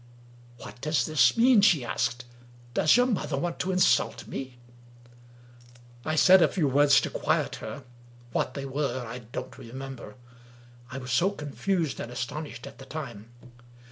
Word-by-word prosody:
"What 120 - -11
does 155 +1 +1
this 155 +7 +3
mean?" 240 -2 +6
she 160 - +4
asked. 120 +1 -2 0.5
"Does 155 - +4
your 245 - +4
mother 200 - -1
want 170 +3 -3
to 185 - -1
insult 185 0 +2
me? 130 -2 -7 0.9
" 120 0 -23
I 155 - -1
said 185 +4 +7
a - - +6
few 165 -7 0
words 140 +1 +5
to - - -4
quiet - - -1
her; 140 - -8 0.5
what 130 - -1
they 140 -1 -4
were 135 -2 -2
I 115 +2 -7
don't 120 -1 -8
remember 130 -2 -9 0.4
— 120 +1 -23
I 130 - -5
was 130 -1 -6
so 170 +10 +3
confused 165 -1 -2
and 120 - -6
astonished 125 +1 -5
at - - -12
the 135 - -10
time. 120 -8 -7
135 Hz, 165 wpm, -27 LUFS, 120-155 Hz, 0.9 s, said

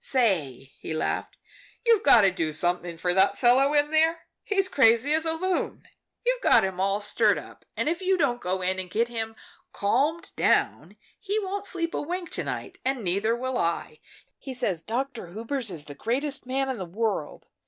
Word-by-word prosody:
"Say," 160 - 0
he 160 - -5
laughed, - - -2 0.5
"you've 460 -3 +5
got 255 -5 +7
to 195 -2 +4
do 160 -4 -2
something 175 +1 0
for 180 +1 0
that 190 +2 +3
fellow 260 +3 +4
in 290 +1 +3
there 320 +1 +3 0.2
he's 395 -3 +1
crazy 255 -1 +4
as 320 +1 +1
a 320 - +2
loon. 370 +3 -2 0.4
You've - - +1
got - - +5
him 190 -1 -3
all 195 +2 +1
stirred 205 - +3
up, - - -11
and - - 0
if 340 +3 -1
you 375 0 +2
don't 250 -7 +1
go 185 +1 -2
in 185 +1 0
and 185 -1 -5
get 230 +5 0
him 225 -1 -4 0.4
calmed 295 +11 0
down - - +1 0.2
he 410 +1 -2
won't 405 -1 -3
sleep 335 -2 -2
a - - -1
wink 350 +3 -4
to - - -2
night, - - -6
and 265 -3 -1
neither 200 +5 +1
will 255 +1 -2
I. 165 -2 -2 0.4
He 265 -1 -7
says 200 -10 -1
Dr. 235 -2 -4
Hubers 230 +3 -3
is 160 -5 -4
the 145 - -9
greatest 270 - -3
man 270 +1 0
in 260 -2 -3
the 185 - -4
world. 200 -2 -3
240 Hz, 195 wpm, -26 LUFS, 190-300 Hz, 0.5 s, got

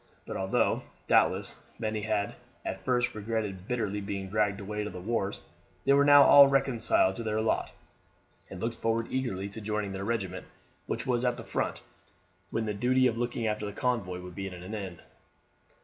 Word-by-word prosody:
But - - -6
although, 95 0 +1 0.2
doubtless, - - +3 0.2
many 110 -2 -2
had 105 -1 -1 0.3
at - - -3
first 125 -1 +1
regretted 105 -3 -3
bitterly 105 -4 -1
being 100 -1 -4
dragged 105 -1 +1
away 105 +1 -3
to 105 - -4
the 90 - -8
wars, 100 0 -2 0.4
they 140 - +5
were 140 0 +5
now 145 0 +8
all 140 0 +9
reconciled 135 -8 +2
to 115 - -4
their 110 -1 -1
lot, 110 0 0 0.8
and 95 - -8
looked 115 +3 -2
forward 115 0 0
eagerly 110 -7 -2
to 110 +2 -8
joining 105 -1 -2
their 95 0 -4
regiment, 100 -5 -3 0.4
which 115 +1 -2
was 125 -2 +1
at 125 -1 +1
the - - -7
front, - - -2 0.7
when 115 - -1
the 105 - -1
duty 125 +5 +2
of 115 -2 +1
looking 120 -1 -2
after 105 -1 -1
the 100 - -6
convoy 105 -8 -1
would 90 0 -9
be 95 +2 -4
at 95 - -7
an 90 +4 -8
end. 95 -5 -6
110 Hz, 185 wpm, -29 LUFS, 100-120 Hz, 0.8 s, all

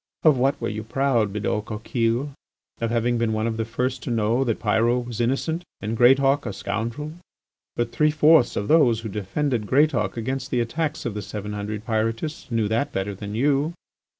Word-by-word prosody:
Of 155 -3 +6
what 135 +2 +1
were - - -2
you 110 0 -3
proud, 115 -2 +1
Bidault 105 +1 -2
Coquille? 115 +5 -1 0.5
Of 115 - -1
having 120 +1 +1
been 115 -1 +1
one 110 0 0
of 115 -1 -2
the 115 - -1
first 125 +3 -2
to - - -5
know 115 +2 +1
that 115 -4 0
Pyrot 115 +3 +2
was 120 -1 -4
innocent 145 +8 0 0.2
and 110 +2 -3
Greatauk 135 +4 +4
a - - -3
scoundrel. 115 +9 -4 0.6
But 120 -1 -1
three 150 0 +3
fourths 155 -3 +4
of 100 - -2
those 125 -8 +4
who 110 - -5
defended 105 +4 -2
Greatauk 130 -7 +2
against 130 +3 -3
the 125 - 0
attacks 150 +6 -2
of 120 - -2
the 105 - -4
seven 105 +1 -6
hundred 105 +1 -5
Pyrotists 115 +7 -2
knew 115 -3 +1
that 120 +6 0
better 95 -2 -2
than 100 +2 -6
you. 145 +5 +1
115 Hz, 190 wpm, -24 LUFS, 110-135 Hz, 0.6 s, Of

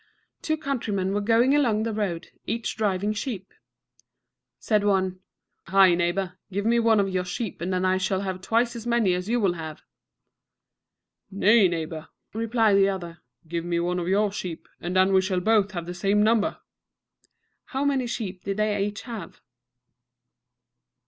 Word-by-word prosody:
Two 315 0 -1
countrymen 220 -10 -2
were 205 - 0
going 230 +5 +3
along 230 -7 +2
the 225 -1 -2
road, 195 -6 -3 0.2
each 230 +1 -2
driving 205 -1 0
sheep. 215 -4 -5 1.0
Said 210 -2 +1
one, 190 -2 +1 0.5
"Hi, 190 0 +6
neighbor, 180 +2 -1
give 200 +2 -2
me 235 +1 +3
one 225 -2 +4
of 200 - +2
your 185 -1 -1
sheep, 180 +2 -5
and 180 +2 -2
then 185 0 0
I 185 0 +3
shall 190 0 0
have 190 -2 -4
twice 235 +4 +1
as 235 0 -7
many 235 -6 +2
as 180 +3 -3
you 240 +1 +2
will 195 -5 +2
have." 160 -3 -8 1.5
"Nay, 205 +1 +5
neighbor," 160 -2 -4 0.3
replied 225 -2 +2
the 195 0 +4
other, 175 -3 -5 0.3
"give 170 +1 -3
me 170 0 -1
one 180 +1 -1
of 175 - -3
your 200 +2 +2
sheep, 180 -4 -6
and 175 +2 -4
then 190 +1 +4
we 190 - +5
shall 185 -1 -1
both 210 +1 +3
have 170 -2 -4
the 175 - -5
same 200 +4 +2
number." 220 -1 +2 1.1
How 270 +2 -2
many 270 -3 +1
sheep 200 -6 -5
did 195 +1 -3
each 205 -1 -1
have? 225 -8 -8
195 Hz, 165 wpm, -25 LUFS, 185-220 Hz, 1.5 s, Hi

